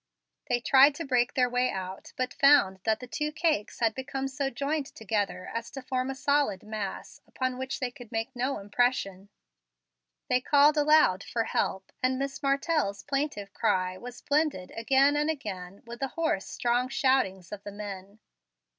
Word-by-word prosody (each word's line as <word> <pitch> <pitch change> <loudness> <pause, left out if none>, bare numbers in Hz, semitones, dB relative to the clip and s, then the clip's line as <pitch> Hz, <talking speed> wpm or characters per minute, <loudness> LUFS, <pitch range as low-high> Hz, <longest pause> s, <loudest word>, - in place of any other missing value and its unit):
They 245 -1 +1
tried 275 +3 +6
to 330 - -5
break 250 -3 +1
their 250 -1 +3
way 250 +1 +1
out, 190 0 -6
but 255 0 -2
found 275 -10 +5
that 220 -1 +2
the - - -6
two 300 +5 -3
cakes 305 -10 -1
had 225 -1 +3
become 265 +1 -4
so 270 0 -2
joined 280 +3 -2
together 205 -4 -3
as 230 0 -4
to 270 - -7
form 255 0 -2
a 270 - -3
solid 280 -8 +1
mass, 210 -2 -6
upon 255 -1 -3
which 260 0 -4
they 255 -2 -2
could 245 -3 -13
make 225 +4 -3
no 255 +3 -1
impression. 200 -2 -1 1.0
They 250 0 +2
called 290 +3 +5
aloud 295 -11 +4
for 230 - -1
help, 190 -3 -2
and 255 0 +1
Miss 275 +2 -4
Martell's 275 -6 0
plaintive 275 -9 -3
cry 185 0 0
was 245 +5 -10
blended 290 -11 0
again 270 +5 +3
and 300 +1 +1
again 200 - -5
with 235 0 -9
the 270 - -1
hoarse, 290 - -1
strong 245 +1 0
shoutings 260 - +1
of 205 -1 -6
the 205 - -7
men. 200 -1 -8
250 Hz, 170 wpm, -28 LUFS, 205-275 Hz, 1.0 s, tried